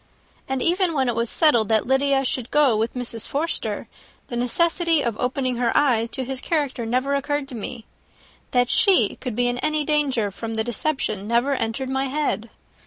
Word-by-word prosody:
And 265 Hz, -1 st, -1 dB
even 355 Hz, 0 st, +1 dB
when 265 Hz, -2 st, +1 dB
it 240 Hz, -, -1 dB
was 230 Hz, 0 st, -1 dB
settled 240 Hz, -10 st, +3 dB
that 220 Hz, -1 st, +2 dB
Lydia 270 Hz, +1 st, +2 dB
should 255 Hz, -1 st, -2 dB
go 290 Hz, -6 st, +3 dB
with 225 Hz, +3 st, -1 dB
Mrs. 235 Hz, -3 st, -3 dB
Forster, 315 Hz, +4 st, -1 dB, 0.4 s
the 240 Hz, -, -4 dB
necessity 330 Hz, +6 st, +2 dB
of 235 Hz, -3 st, -1 dB
opening 255 Hz, 0 st, -1 dB
her 240 Hz, -1 st, +1 dB
eyes 235 Hz, -5 st, +2 dB
to 260 Hz, -, -2 dB
his 260 Hz, 0 st, -4 dB
character 280 Hz, -7 st, -1 dB
never 255 Hz, +4 st, 0 dB
occurred 290 Hz, 0 st, -1 dB
to 255 Hz, -, -7 dB
me. 230 Hz, +1 st, -7 dB, 0.6 s
That 245 Hz, -1 st, +1 dB
she 365 Hz, -, +4 dB
could 250 Hz, -4 st, -5 dB
be 245 Hz, +1 st, +1 dB
in 245 Hz, 0 st, -1 dB
any 305 Hz, 0 st, 0 dB
danger 275 Hz, -9 st, +1 dB
from 225 Hz, +3 st, -6 dB
the 220 Hz, -, 0 dB
deception 230 Hz, -4 st, -2 dB
never 240 Hz, +5 st, +2 dB
entered 255 Hz, +1 st, -2 dB
my 265 Hz, +1 st, 0 dB
head. 270 Hz, -5 st, -2 dB
255 Hz, 185 wpm, -23 LUFS, 235-285 Hz, 0.6 s, she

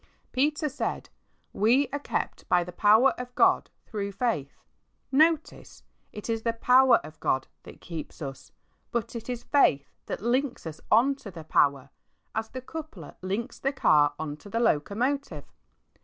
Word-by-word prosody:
Peter 295 Hz, +3 st, +1 dB
said, 290 Hz, 0 st, -4 dB, 0.2 s
" -, -, -43 dB
We 265 Hz, +4 st, +4 dB
are 285 Hz, -, -1 dB
kept -, -, -4 dB
by 175 Hz, -1 st, +4 dB
the 180 Hz, -, -8 dB
power 215 Hz, +8 st, +5 dB
of 250 Hz, 0 st, -7 dB
God -, -, +3 dB, 0.2 s
through 200 Hz, -2 st, -4 dB
faith," 195 Hz, -, -2 dB, 0.5 s
Notice, 315 Hz, +3 st, +1 dB, 0.3 s
it 210 Hz, -, -8 dB
is 225 Hz, -1 st, -1 dB
''the 230 Hz, 0 st, -2 dB
power 255 Hz, +2 st, +6 dB
of 155 Hz, +1 st, -12 dB
God" 130 Hz, 0 st, 0 dB, 0.2 s
that -, -, -14 dB
keeps 165 Hz, -3 st, -8 dB
us, 135 Hz, -3 st, -8 dB, 0.4 s
but 235 Hz, 0 st, -3 dB
it 230 Hz, +1 st, -6 dB
is 245 Hz, -1 st, -4 dB
faith 140 Hz, -, +2 dB, 0.2 s
that -, -, -3 dB
links 250 Hz, 0 st, 0 dB
us 160 Hz, -1 st, -7 dB
on 245 Hz, +6 st, +5 dB
to 220 Hz, -, -10 dB
the 165 Hz, -4 st, -9 dB
power, 140 Hz, -3 st, +2 dB, 0.4 s
as 220 Hz, 0 st, -3 dB
the 255 Hz, -, -7 dB
coupler 275 Hz, -, -8 dB
links 200 Hz, +7 st, -4 dB
the 275 Hz, -, 0 dB
car 145 Hz, -, +4 dB
on 150 Hz, -2 st, -5 dB
to 205 Hz, -, -13 dB
tne 230 Hz, +3 st, -1 dB
locomotive. 220 Hz, -, 0 dB
225 Hz, 165 wpm, -27 LUFS, 160-260 Hz, 0.5 s, power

